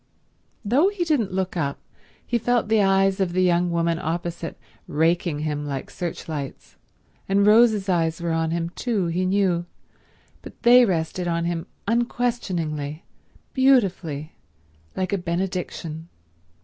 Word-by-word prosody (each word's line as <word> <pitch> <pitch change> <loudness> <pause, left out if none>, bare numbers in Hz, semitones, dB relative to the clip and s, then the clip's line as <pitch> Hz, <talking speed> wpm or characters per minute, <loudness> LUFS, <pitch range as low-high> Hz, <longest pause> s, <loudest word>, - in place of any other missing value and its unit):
Though 265 - +4
he 400 -3 -1
didn't 290 - +1
look 185 0 -2
up 140 -5 -2 0.5
he 240 - 0
felt 240 -1 +1
the 220 -1 +4
eyes 195 0 +3
of 185 -3 0
the 185 +1 +2
young 175 0 +2
woman 170 -1 0
opposite 170 0 -4 0.3
raking 165 0 +1
him 150 -1 -2
like 140 -2 -5
searchlights, 155 -5 -6 0.5
and 200 +1 +3
Rose's 215 -2 +5
eyes 165 -3 +1
were 170 -1 -2
on 165 0 0
him 170 0 -2
too, 215 -3 -1
he 175 +2 0
knew, 185 -3 +1 0.7
but - - -12
they 245 +1 +8
rested 175 -1 -1
on 170 0 0
him 170 +1 -2 0.2
unquestioningly, 185 -11 -1 0.5
beautifully, 190 - +2 0.6
like 185 0 -2
a 200 - +1
benediction. 175 -2 -4
175 Hz, 135 wpm, -24 LUFS, 165-205 Hz, 0.7 s, they